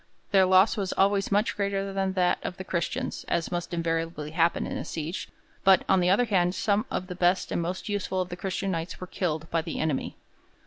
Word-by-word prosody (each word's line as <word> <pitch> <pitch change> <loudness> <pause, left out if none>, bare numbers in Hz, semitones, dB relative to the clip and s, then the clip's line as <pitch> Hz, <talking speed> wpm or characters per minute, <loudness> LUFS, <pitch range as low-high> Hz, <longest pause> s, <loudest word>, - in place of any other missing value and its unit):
Their 190 -2 +5
loss 190 +4 +5
was 195 -3 -1
always 195 0 +2
much 205 +3 +2
greater 200 -1 -1
than 195 -1 0
that 180 -2 +2
of 180 - -5
the 190 - -5
Christians, 170 -2 -2
as 170 - -1
must 175 -1 -3
invariably 165 -2 -2
happen 165 +1 +2
in - - -4
a - - -3
siege; 160 +2 -5 0.3
but, 190 -1 +6
on 190 - +4
the 180 0 +2
other 205 +6 +4
hand, 180 -4 +2
some 210 0 +1
of 180 - -2
the 185 - -6
best 180 +1 +1
and - - 0
most 180 +2 -4
useful 200 -2 -1
of 185 -1 -1
the 175 - -5
Christian 190 +1 -2
Knights 165 0 -4
were 185 - -5
killed 160 -3 -2
by 165 - +2
the 165 0 -5
enemy. 155 -4 -1
185 Hz, 220 wpm, -27 LUFS, 170-195 Hz, 0.3 s, but